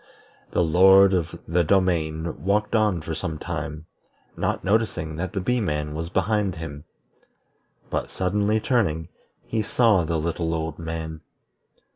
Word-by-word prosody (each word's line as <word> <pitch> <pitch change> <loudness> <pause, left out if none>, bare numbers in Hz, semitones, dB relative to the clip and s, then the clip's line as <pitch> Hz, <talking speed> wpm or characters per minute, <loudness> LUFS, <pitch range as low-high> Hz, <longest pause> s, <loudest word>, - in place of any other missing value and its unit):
The 90 - +1
Lord 95 +4 +6
of 85 -4 -1
the 85 +2 +2
Domain 80 -4 0
walked 105 +3 +1
on 105 -6 +2
for 80 +1 -5
some 80 0 -4
time, 75 +1 -5 0.5
not - - -1
noticing 95 -6 0
that 90 +2 -4
the 100 - -1
Bee 125 +6 0
man 75 -5 -2
was 80 +2 -4
behind 100 +1 0
him. 75 -2 -7 1.1
But - - -2
suddenly 100 +3 +1
turning, 90 - 0 0.4
he 110 - -1
saw 110 -3 +3
the 80 +1 -1
little 80 +1 -1
old 80 0 -4
man. 80 -1 -5
85 Hz, 140 wpm, -24 LUFS, 80-100 Hz, 1.1 s, Lord